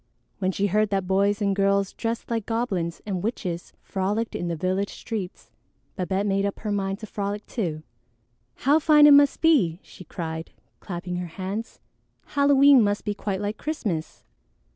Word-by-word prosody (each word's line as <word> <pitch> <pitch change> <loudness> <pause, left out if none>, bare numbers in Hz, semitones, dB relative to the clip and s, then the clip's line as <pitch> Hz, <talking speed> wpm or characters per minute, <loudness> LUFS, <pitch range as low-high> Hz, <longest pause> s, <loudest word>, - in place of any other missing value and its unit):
When 190 -1 +1
she 195 +2 -1
heard 210 +2 +2
that 195 -2 0
boys 200 +2 +1
and 200 -1 +1
girls 200 0 +1
dressed 230 +1 -4
like 225 -3 -2
goblins 195 -8 -2
and 190 -4 -2
witches 180 -5 -4
frolicked 205 +4 -2
in 175 - -3
the 170 - -2
village 185 +4 -1
streets, 205 -5 -6 0.4
Babette 190 +2 -1
made 195 -1 +1
up 200 0 -2
her 215 - -3
mind 195 -1 -1
to - - -5
frolic 205 0 -4
too. 165 -9 -3 0.8
"How 290 +4 +5
fine 300 -1 +6
it 295 - +9
must 285 0 +5
be!" 225 - +3
she - - -13
cried, 160 -1 -6 0.3
clapping 180 -1 -5
her 180 0 -4
hands. 200 +4 -5 0.5
"Halloween 280 -1 +6
must 205 -1 0
be 210 - 0
quite 200 -1 -3
like 205 +1 -3
Christmas!" 205 - -4
200 Hz, 165 wpm, -25 LUFS, 185-225 Hz, 0.8 s, it